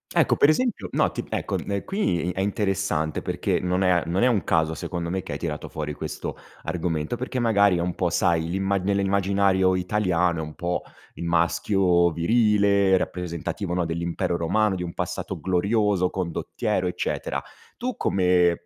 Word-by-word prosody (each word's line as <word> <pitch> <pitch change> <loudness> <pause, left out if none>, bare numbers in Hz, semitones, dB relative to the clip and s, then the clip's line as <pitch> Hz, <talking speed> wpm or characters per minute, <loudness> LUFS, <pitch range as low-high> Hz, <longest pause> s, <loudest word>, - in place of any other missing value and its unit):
Ecco, - - +4
per 145 - +5
esempio, 175 - 0
no - - +2
ti - - -4
ecco, - - -2
uhm, 100 -1 -3
qui 90 - 0
è - - -6
interessante 95 -6 -1
perché, - - -1
non 90 +1 0
è 90 - +3
a 90 -2 +3
non 90 +5 0
è 125 - +5
un 110 -9 +2
caso 80 0 +1
secondo 85 0 -4
me, 95 +1 -2
che - - -7
hai - - -3
tirato 75 -4 -4
fuori 75 -1 -4
questo - - -5 0.3
argomento 80 +1 -2
perché 130 +1 -3
magari 100 -5 +4
è - - -2
un 90 0 -2
po' 90 -2 0
sai, 85 -2 +2
l'imma 95 +2 0
nell'immaginario 95 -1 +2
italiano 90 -3 +1
è 80 - -2
un 75 - -7
po' 90 +1 -2 0.3
il - - -6
maschio 85 +1 +2
virile 100 +1 +3
rappresentativo, 85 +1 -3
no, 90 -1 0
dell'Impero 85 +1 -2
Romano, 105 +4 +1
di 90 - -4
un 85 - -5
passato - - -4
glorioso, 95 0 +1
condottiero, 95 +2 -2
eccetera; 90 - -2 0.4
tu 250 +1 -3
come, 90 -2 +2
90 Hz, 170 wpm, -24 LUFS, 85-100 Hz, 0.4 s, per